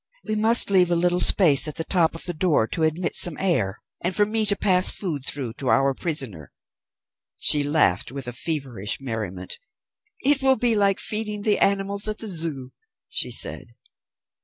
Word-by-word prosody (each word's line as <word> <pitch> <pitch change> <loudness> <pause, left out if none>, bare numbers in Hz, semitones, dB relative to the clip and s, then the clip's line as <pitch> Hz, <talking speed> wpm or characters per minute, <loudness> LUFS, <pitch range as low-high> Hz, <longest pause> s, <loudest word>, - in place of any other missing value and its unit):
We 215 - -3
must 220 0 +4
leave 180 -3 +3
a 175 - 0
little 175 +1 0
space 160 -8 +5
at 150 - -7
the 165 - -4
top 165 -2 0
of 165 - -5
the 175 - -3
door 155 -8 0
to 165 - -5
admit 160 +3 -2
some 175 -4 +4
air, 125 - -2 0.2
and 180 +1 0
for 205 - +2
me 215 0 -2
to 205 - +2
pass 185 -2 +4
food 150 -9 -2
through 130 -6 -4
to 135 - -4
our 135 0 +2
prisoner." 130 - -3 0.9
She 150 - +4
laughed 145 - 0
with 135 -2 -7
a 120 - -5
feverish 130 - -4
merriment. 110 -8 -7 0.6
"It 280 +1 +2
will 265 0 +3
be 235 +1 +1
like 200 -2 +1
feeding 210 -1 -3
the 210 -1 +1
animals 200 +1 +1
at 215 0 -4
the 220 - -8
Zoo," 155 -7 -3 0.4
she - - -1
said. - - -1
170 Hz, 185 wpm, -22 LUFS, 135-200 Hz, 0.9 s, space